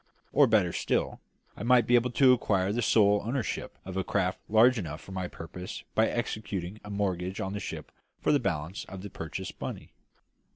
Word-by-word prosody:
Or, 145 0 +6
better 105 -7 +3
still, - - -1 0.4
I - - -9
might 120 +1 +5
be 120 - +1
able 120 +1 +4
to 130 +1 +6
acquire 100 -5 +1
the 120 - 0
sole 105 -2 +4
ownership 120 +1 -3
of 95 -1 -6
a 95 - +1
craft 90 0 0
large 115 +3 +5
enough 80 -5 -5
for 95 - -13
my 95 -1 -3
purpose 90 +2 -8
by 110 0 +4
executing 110 -4 -3
a 105 - -9
mortgage 95 -2 -2
on 95 +1 -3
the 105 - -3
ship - - -6 0.3
for - - +1
the 145 - +4
balance 90 - -2
of 95 0 -9
the 100 - -7
purchase 85 +3 -6
money. - - -6
100 Hz, 195 wpm, -29 LUFS, 95-115 Hz, 0.4 s, Or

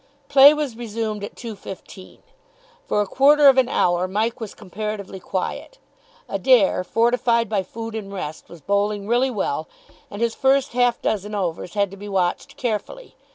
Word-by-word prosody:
Play 280 0 +9
was 295 -6 -3
resumed 220 -2 -4
at 205 - -7
2.15. 195 -4 -10 0.7
For 210 - +1
a - - 0
quarter 285 +7 +5
of 265 -1 +7
an 255 - +2
hour 175 +1 +1
Mike 220 +6 -1
was 220 -3 -7
comparatively 205 -1 -6
quiet. 190 - -4 0.5
Adair, 235 -8 +3
fortified 235 +3 +1
by 205 -2 0
food 225 +4 -7
and 210 -3 -6
rest, 160 -5 -6
was 170 -2 -13
bowling 200 +3 -1
really 245 +3 +2
well, 175 - -2 0.4
and 205 - -8
his 235 0 0
first 270 +1 +2
half 245 -1 +2
dozen 210 0 -2
overs 180 -1 -3
had 200 -2 +1
to 195 - -10
be 205 +1 -8
watched 185 -3 -1
carefully. 255 - -4
215 Hz, 160 wpm, -22 LUFS, 195-240 Hz, 0.7 s, Play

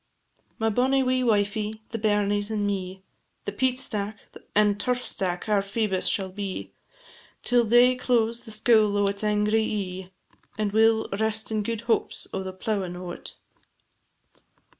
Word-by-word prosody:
My 225 0 +1
bonny 265 +4 +2
wee 255 0 +1
wifie, 210 -1 0
the 230 - -3
bairnies, 205 -1 +1
and 210 -2 -1
me, 190 -1 -3 0.4
The - - -2
peat 255 +4 0
stack, 210 -4 -3 0.4
and 205 -1 +3
turf 250 +2 -1
stack 180 -1 -2
our 210 -2 +3
Phoebus 200 -1 -1
shall 190 -2 +1
be, 195 -1 -5 0.7
Till 245 -1 +4
day 240 +3 +5
close 235 -2 +1
the 230 - -12
scoul 215 -1 +3
o' 205 - +3
its 200 +1 0
angry 210 +1 +2
ee, 190 -4 -3 0.5
And 210 -1 0
we 220 +2 +5
'll 220 0 +1
rest 220 0 0
in 215 -1 0
gude 225 +1 -3
hopes 235 -1 -1
o' - - -2
the 190 0 -5
plowin' 190 -1 -3
o't. 180 -1 -7
210 Hz, 155 wpm, -26 LUFS, 200-225 Hz, 0.7 s, day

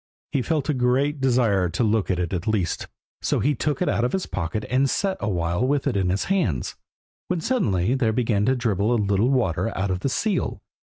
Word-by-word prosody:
He 140 -3 +1
felt 155 +2 -1
a 150 - +2
great 135 +3 +1
desire 115 -8 +2
to 90 +8 -1
look 110 -2 +1
at 95 - +1
it 90 -1 -2
at 90 +2 -3
least, 100 -6 -1 0.3
so - - 0
he 145 - +2
took 145 -1 -1
it - - -2
out 115 - +1
of 125 - 0
his 190 - -1
pocket 90 +5 -3
and 135 +2 +2
sat 195 +5 0
a 105 - -2
while 85 +1 0
with 140 +2 +1
it 135 -6 0
in 95 -2 +1
his 95 +2 0
hands, 115 - -1 0.5
when 175 - -1
suddenly 120 - +1
there 125 -4 +1
began 110 -3 +1
to 130 - +3
dribble 110 -3 0
a - - +3
little 100 +1 +2
water 115 -6 +1
out 95 +1 0
of 90 - -1
the 135 - -1
seal. 210 - -1
115 Hz, 225 wpm, -24 LUFS, 95-135 Hz, 0.5 s, to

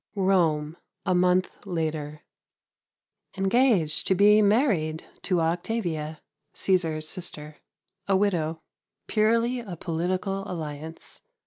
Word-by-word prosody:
Rome, 170 -5 +1 0.3
a - - +2
month 180 +1 +3 0.2
later. 155 -5 -3 1.1
Engaged 195 - +4
to 190 - +3
be 210 +3 +6
married 200 - +1 0.2
to 180 -3 0
Octavia, 165 -3 -2 0.4
Cæsar's 165 -5 +1
sister, 155 -4 -6 0.5
a 195 -1 +3
widow. 165 -5 0 0.4
Purely 230 +3 +2
a 200 -7 -7
political 185 +4 -2
alliance. 160 -1 -6
180 Hz, 95 wpm, -26 LUFS, 155-200 Hz, 1.1 s, be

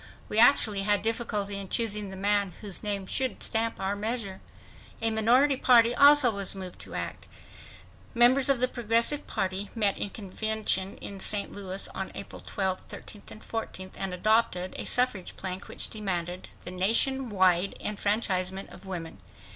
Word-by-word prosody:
We 215 - +1
actually 220 -4 +5
had 205 0 +1
difficulty 215 -3 -2
in 195 -2 -8
choosing 210 -3 0
the 190 - -8
man 200 -1 +1
whose 200 -4 -4
name 200 -2 -2
should 260 +6 -2
stamp 225 0 0
our 195 +1 -1
measure. 210 -2 -4 0.6
A 225 0 0
minority 245 +6 +3
party 240 -2 +5
also 285 -2 +7
was 200 -2 -2
moved 185 -2 -8
to - - -7
act. - - -5 0.9
Members 255 +3 +5
of 275 -3 +4
the 255 - +2
Progressive 235 +4 +1
Party 190 +1 -2
met 205 -3 +1
in 205 - -2
convention 205 -1 -1
in 200 -1 -8
St. 200 +1 0
Louis 195 -1 -3
on - - -5
April - - -9
12, 190 -2 -2
13 210 - -10
and 220 - -11
14 190 -4 -6
and 195 -1 -4
adopted 185 -1 +1
a - - -5
suffrage 245 -7 +2
plank 185 0 -6
which - - -2
demanded 180 -4 -3
"the 180 - -6
nation 230 +8 +1
wide 185 -2 +2
enfranchisement 195 -3 -2
of 195 - -13
women 165 - -6
205 Hz, 160 wpm, -28 LUFS, 190-230 Hz, 0.9 s, also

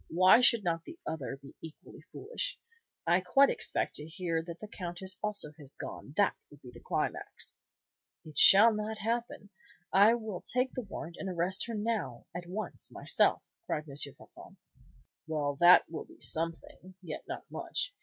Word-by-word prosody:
Why 185 +7 +6
should 235 -3 +6
not 165 -2 -1
the 335 - -11
other 140 -3 -4
be 140 0 -14
equally 160 -1 -12
foolish? - - -4 0.5
I 170 +2 +4
quite 270 +10 +4
expect - - 0
to 150 - -7
hear 165 -1 -2
that 170 0 -9
the 215 - -8
Countess 185 -1 -3
also 210 -7 -2
has 140 -2 -4
gone, 140 - -8
that 205 - +3
would 145 - -16
be 125 - -11
the - - -13
climax!" - - -4 0.7
"It 155 -2 -12
shall 220 +4 +9
not 215 +1 -3
happen. 225 -2 -3 0.4
I 205 +4 +6
will 220 -6 -6
take 255 +1 -1
the 255 - -3
warrant 170 -6 -8
and 195 - -4
arrest 185 +4 -1
her 230 - -4
now, 205 - -3
at 175 0 -6
once, 210 +4 -5
myself," - - +1 0.2
cried 150 +1 -3
M. 140 - -9
Floçon. 140 -1 -5 0.7
"Well, 145 -3 -1
that 175 +3 +7
will 160 - -7
be - - -18
something, 165 +3 -4
yet 160 -3 -7
not - - -6
much. - - -2
180 Hz, 170 wpm, -31 LUFS, 160-215 Hz, 0.7 s, shall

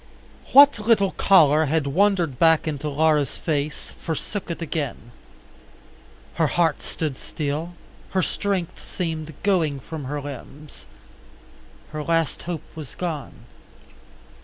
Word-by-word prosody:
What 285 -3 +8
little 210 -3 +3
color 160 -5 +5
had 155 0 +1
wandered 170 -2 +1
back 160 -1 +4
into 150 -1 -2
Laura's 150 -1 +2
face 150 -2 -3
forsook 175 +5 -4
it 170 - -4
again. 145 -8 -4 1.2
Her 160 - +2
heart 165 0 +1
stood 155 -4 -3
still, 155 +4 -4 0.3
her 185 -1 +1
strength 195 -3 -2
seemed 160 -4 -4
going 165 -8 +1
from 150 +1 -7
her 145 +3 -3
limbs. 145 +1 -10 1.0
Her 155 0 -4
last 165 0 0
hope 160 -3 -3
was 155 -5 -9
gone. 160 -7 -5
160 Hz, 115 wpm, -23 LUFS, 145-175 Hz, 1.2 s, What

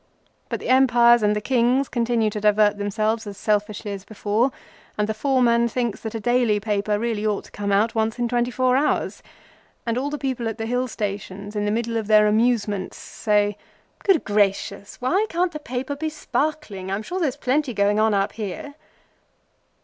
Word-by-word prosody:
But - - -2
the - - -6
Empires 240 -2 +5
and 210 0 +2
the - - 0
Kings 255 +3 +2
continue 235 -2 0
to 210 - -4
divert 210 0 +3
themselves 215 +2 -1
as 200 -1 -7
selfishly 210 0 -1
as 195 -1 -6
before, 215 +4 0 0.5
and 210 0 +1
the 220 - -1
foreman 235 -1 +2
thinks 235 -2 -2
that 220 0 -6
a - - -2
daily 240 -2 +2
paper 205 0 0
really 220 -1 -2
ought 210 -2 0
to - - -17
come 200 -1 -3
out 210 +3 +2
once 220 0 0
in 240 -1 0
twenty 240 0 0
four 255 0 +2
hours, 285 +3 0 0.6
and 235 +1 0
all 280 +2 -2
the 295 - -3
people 260 -4 -2
at 225 - -6
the 225 - -3
Hill 245 +2 0
stations 205 -2 -5
in 205 0 -1
the 205 - +1
middle 230 +1 -1
of 220 -2 -3
their 215 -1 +6
amusements 210 -3 +1
say:—"Good 210 - -1
gracious! 200 -1 0
Why 370 - +1
can't 350 +1 0
the 305 - -6
paper 265 0 -4
be 315 +2 -3
sparkling? 295 -10 -3
I'm 200 +2 -2
sure 365 +11 -4
there's 285 -6 0
plenty 270 -2 0
going 205 +1 +2
on 220 -1 +3
up 195 0 +1
here." 220 +7 -6
225 Hz, 190 wpm, -23 LUFS, 210-250 Hz, 0.6 s, their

